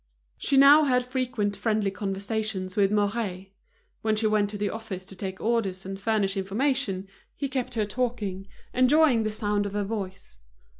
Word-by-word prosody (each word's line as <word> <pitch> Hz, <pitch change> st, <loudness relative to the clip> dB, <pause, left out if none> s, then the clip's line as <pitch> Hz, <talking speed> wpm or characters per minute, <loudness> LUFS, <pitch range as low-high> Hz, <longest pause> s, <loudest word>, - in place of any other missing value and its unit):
She 275 Hz, -, +2 dB
now 285 Hz, +3 st, +8 dB
had 250 Hz, -2 st, +2 dB
frequent 250 Hz, -5 st, -1 dB
friendly 210 Hz, -1 st, 0 dB
conversations 200 Hz, -1 st, -3 dB
with 200 Hz, -2 st, +3 dB
Mouret. 205 Hz, -2 st, -1 dB, 0.5 s
When 220 Hz, -1 st, +1 dB
she 215 Hz, +1 st, 0 dB
went 215 Hz, -1 st, +2 dB
to 205 Hz, -, -6 dB
the 205 Hz, 0 st, -1 dB
office 215 Hz, -5 st, -6 dB
to 195 Hz, -, -12 dB
take 190 Hz, 0 st, -5 dB
orders 205 Hz, -5 st, -1 dB
and 195 Hz, +1 st, -6 dB
furnish 205 Hz, -2 st, +1 dB
information, 200 Hz, 0 st, 0 dB, 0.3 s
he 280 Hz, -, -2 dB
kept 260 Hz, -2 st, -3 dB
her 215 Hz, -2 st, +1 dB
talking, 205 Hz, -4 st, -3 dB, 0.3 s
enjoying 255 Hz, -1 st, +4 dB
the 215 Hz, -1 st, -1 dB
sound 205 Hz, -1 st, -1 dB
of 200 Hz, -, -7 dB
her 205 Hz, 0 st, 0 dB
voice. 195 Hz, -, -6 dB
210 Hz, 165 wpm, -26 LUFS, 195-235 Hz, 0.5 s, now